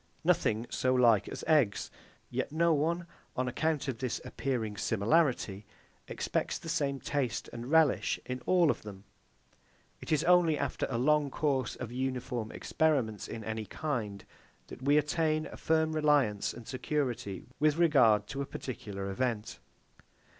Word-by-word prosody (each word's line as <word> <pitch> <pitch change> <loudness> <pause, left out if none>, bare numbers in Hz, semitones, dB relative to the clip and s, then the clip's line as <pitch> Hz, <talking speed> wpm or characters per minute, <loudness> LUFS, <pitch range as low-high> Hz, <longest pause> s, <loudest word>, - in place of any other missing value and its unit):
Nothing 110 +2 +2
so 130 0 +1
like 115 -5 +4
as - - -7
eggs; 145 -11 +2 0.4
yet - - -2
no 165 +2 +3
one, 165 +4 0 0.3
on 130 0 0
account 155 +3 -1
of 125 -4 -3
this 130 -2 -2
appearing 115 -6 -2
similarity, 110 -2 +1 0.4
expects - - -2
the 165 - -8
same 140 -3 0
taste 135 -6 -2
and 120 +2 -6
relish 160 -3 +3
in 125 0 -4
all 175 -4 +5
of - - -5
them. 100 -2 -10 1.0
It - - -8
is 155 0 +3
only 175 -3 +4
after 140 -2 -2
a 120 - -1
long 150 +3 +3
course 135 -4 0
of 120 -2 -6
uniform 125 -3 -3
experiments 135 -10 0
in 110 - -6
any 110 0 -4
kind, 115 -10 -3 0.4
that - - -10
we 145 +3 +4
attain 155 +1 +1
a - - -8
firm 160 0 +1
reliance 145 -9 +2
and 120 -1 -11
security 130 - -2 0.2
with 150 +1 +3
regard 125 -11 +5
to 140 - -3
a 140 - -3
particular 100 -8 -5
event. 115 0 -2
130 Hz, 150 wpm, -31 LUFS, 115-155 Hz, 1.0 s, all